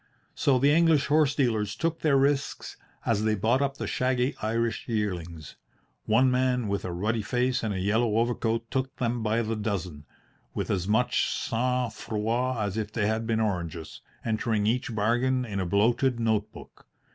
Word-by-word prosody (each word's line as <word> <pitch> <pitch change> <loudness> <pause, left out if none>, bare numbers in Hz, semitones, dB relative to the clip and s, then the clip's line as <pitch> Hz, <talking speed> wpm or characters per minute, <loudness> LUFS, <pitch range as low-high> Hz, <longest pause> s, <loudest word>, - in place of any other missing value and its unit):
So 135 -2 +2
the 140 +3 +4
English 160 -2 +4
horse 145 -2 +3
dealers 110 -7 0
took 165 0 -1
their 145 -3 +3
risks 140 +1 0 0.3
as 110 -2 +1
they 110 0 +2
bought 115 +6 +1
up 140 -1 -1
the - - -4
shaggy 125 +1 0
Irish 115 +1 -1
yearlings. 85 - -4 0.5
One 125 +4 +4
man 125 -2 +1
with 100 0 -2
a 90 - -4
ruddy 105 +6 -1
face 125 +5 0
and 110 - -2
a 95 - -2
yellow 110 +3 +1
overcoat 115 -1 0
took 130 0 -2
them 120 -1 -1
by 110 +2 +1
the 110 0 -2
dozen, 90 -8 -4 0.5
with - - -2
as 95 -2 -1
much 110 +4 +2
sang 125 +1 -1
froid 115 +5 -2
as 100 +2 -4
if 105 -1 -3
they 110 -2 -1
had 110 +1 -1
been 115 -1 +1
oranges, 85 -7 -3 0.2
entering 110 -1 0
each 115 +1 0
bargain 120 +4 +1
in 100 -4 -4
a 95 - -1
bloated 115 +6 +2
note 110 -2 0
book. - - -14
115 Hz, 175 wpm, -27 LUFS, 105-125 Hz, 0.5 s, the